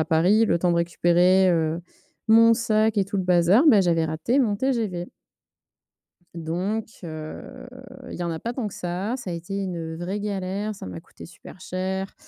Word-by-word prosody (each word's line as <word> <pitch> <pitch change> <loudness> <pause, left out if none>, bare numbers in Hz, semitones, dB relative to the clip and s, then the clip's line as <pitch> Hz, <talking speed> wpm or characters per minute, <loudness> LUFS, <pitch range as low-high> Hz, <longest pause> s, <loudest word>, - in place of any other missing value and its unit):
à 155 - +2
Paris, 185 +8 +3
le 170 - +2
temps 175 +1 +1
de - - +1
récupérer, 175 +2 +3
heu, 165 0 0 0.5
mon 230 +1 +7
sac 220 -2 +1
et 195 - +2
tout 200 +1 -5
le 190 - 0
bazar, 180 - +4
ben 215 -7 +6
j'avais 165 -2 +1
raté 160 - -1
mon 220 -6 +2
TGV. 215 -9 -2 1.3
Donc, 180 +7 -3 0.2
heu, 155 -1 -8 0.4
il - - -7
y - - -3
en 170 - -2
a 160 - -4
pas 235 +6 -4
tant 235 -5 -3
que - - -11
ça, 180 +6 -3
ça 200 -8 -7
a - - -3
été 170 +4 -5
une 170 -4 -4
vraie 185 +4 -4
galère, 200 +1 -3
ça 190 - -9
m'a 90 -2 -7
coûté - - -14
super 185 - -14
cher. 190 +1 -4
185 Hz, 190 wpm, -24 LUFS, 170-210 Hz, 1.3 s, mon